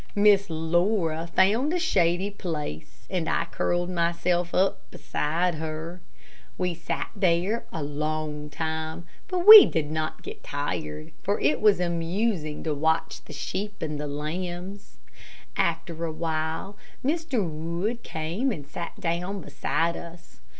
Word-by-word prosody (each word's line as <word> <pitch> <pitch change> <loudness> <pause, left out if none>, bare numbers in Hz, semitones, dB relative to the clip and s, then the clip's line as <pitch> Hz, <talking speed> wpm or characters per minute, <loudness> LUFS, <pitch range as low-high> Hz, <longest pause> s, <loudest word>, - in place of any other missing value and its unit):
Miss 205 -1 +5
Laura 165 +1 +1
found 220 +10 +4
a - - +2
shady 190 - +2
place, 155 - -6
and 175 -4 -2
I 165 - +1
curled 175 +1 -1
myself 170 0 0
up 190 +1 +1
beside 170 +4 -1
her. 160 +2 -5 0.6
We 180 -1 0
sat 170 0 -4
there 190 +3 +1
a 160 - -4
long 150 +1 -3
time, 160 +2 -4 0.2
but 365 -1 -1
we 430 -2 +13
did 155 -2 -1
not 155 0 -3
get - - -8
tired, 80 - -4
for 200 +1 0
it 150 +2 +2
was 210 -3 +5
amusing 170 -1 -1
to 155 - -1
watch 160 +3 0
the - - -10
sheep 200 +7 -4
and 150 -2 -3
lambs. 175 +6 -5 0.6
After 170 -2 -1
a 165 - -1
while, 160 +4 -3 0.3
Mr. 285 - 0
Wood 170 +9 -3
came 170 +12 -2
and 145 -9 -6
sat - - -7
down 180 +4 -2
beside 170 0 -1
us. 170 - -11
170 Hz, 135 wpm, -26 LUFS, 155-195 Hz, 0.6 s, we